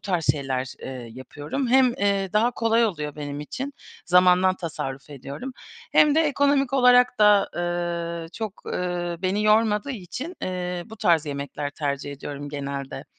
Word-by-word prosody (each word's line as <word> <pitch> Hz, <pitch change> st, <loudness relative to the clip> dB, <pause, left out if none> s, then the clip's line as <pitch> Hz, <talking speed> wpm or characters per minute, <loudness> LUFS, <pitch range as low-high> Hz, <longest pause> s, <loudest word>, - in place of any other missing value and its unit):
tarz 175 Hz, -5 st, -1 dB
şeyler, 130 Hz, -3 st, -3 dB
eee, 125 Hz, -3 st, -7 dB
yapıyorum. 145 Hz, -, -4 dB
Hem, 255 Hz, -1 st, +5 dB
eee, 200 Hz, -3 st, 0 dB
daha 220 Hz, +3 st, +3 dB
kolay 230 Hz, -1 st, +2 dB
oluyor 150 Hz, -8 st, -3 dB
benim 145 Hz, -1 st, -5 dB
için 270 Hz, -, -5 dB, 0.3 s
zamandan 180 Hz, +1 st, +5 dB
tasarruf 140 Hz, -5 st, -5 dB
ediyorum, 145 Hz, -, -7 dB, 0.4 s
hem 300 Hz, -1 st, +5 dB
de 320 Hz, -, +4 dB
ekonomik 280 Hz, -2 st, +2 dB
olarak 250 Hz, -2 st, +5 dB
da, 210 Hz, -1 st, +5 dB
eee, 170 Hz, -1 st, -2 dB
çok, 220 Hz, -3 st, -6 dB
eee, 175 Hz, -1 st, -2 dB
beni 195 Hz, +3 st, 0 dB
yormadığı 215 Hz, +3 st, +3 dB
için, 255 Hz, -, -6 dB
eee, 180 Hz, -1 st, -3 dB
bu 220 Hz, 0 st, -11 dB
tarz 165 Hz, -5 st, +2 dB
yemekler 145 Hz, 0 st, -4 dB
tercih 140 Hz, -1 st, -3 dB
ediyorum 145 Hz, +1 st, -7 dB
genelde. 140 Hz, -1 st, -5 dB
180 Hz, 145 wpm, -24 LUFS, 145-225 Hz, 0.4 s, Hem